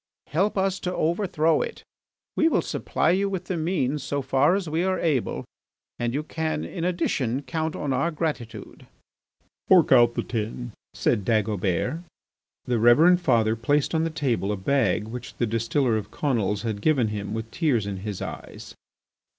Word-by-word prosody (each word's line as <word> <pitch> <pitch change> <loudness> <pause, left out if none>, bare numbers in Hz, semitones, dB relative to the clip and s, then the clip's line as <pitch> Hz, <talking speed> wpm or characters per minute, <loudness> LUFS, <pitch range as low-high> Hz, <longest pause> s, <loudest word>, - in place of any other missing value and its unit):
Help 195 +8 +1
us 190 0 +1
to 180 0 -3
overthrow 165 -2 +1
it; - - -5 0.5
we 320 - +3
will 325 - +2
supply 160 - 0
you 195 +2 +1
with 185 -2 -4
the 185 - -2
means 155 -4 -1
so 140 +1 -2
far 135 +6 +3
as 195 -3 -2
we 160 +3 0
are 190 0 +1
able, 150 -9 -1 0.5
and 120 0 0
you 145 +5 -2
can 155 -1 -3
in 170 - -5
addition 145 -7 -1
count 160 +1 -3
on 140 -2 -2
our 140 +6 +1
gratitude." 135 -10 -5 0.8
"Fork 180 -5 +5
out 120 -2 +6
the - - -1
tin," 115 +1 -4 0.2
said 100 +2 +1
Dagobert. 105 - 0 0.7
The 120 -2 0
Reverend 160 +11 +6
Father 115 -7 +2
placed 140 +8 0
on 160 0 +2
the 165 - 0
table 125 -10 -1
a 105 - -2
bag 110 0 +1
which 120 +2 -8
the 120 - 0
distiller 115 +2 0
of 105 -1 -5
Conils 105 -8 -1
had 110 -3 -3
given 130 -6 +2
him 105 0 -4
with 110 0 -5
tears 135 - +1
in 100 -1 -4
his 100 0 -5
eyes. - - -8
135 Hz, 170 wpm, -25 LUFS, 115-165 Hz, 0.8 s, out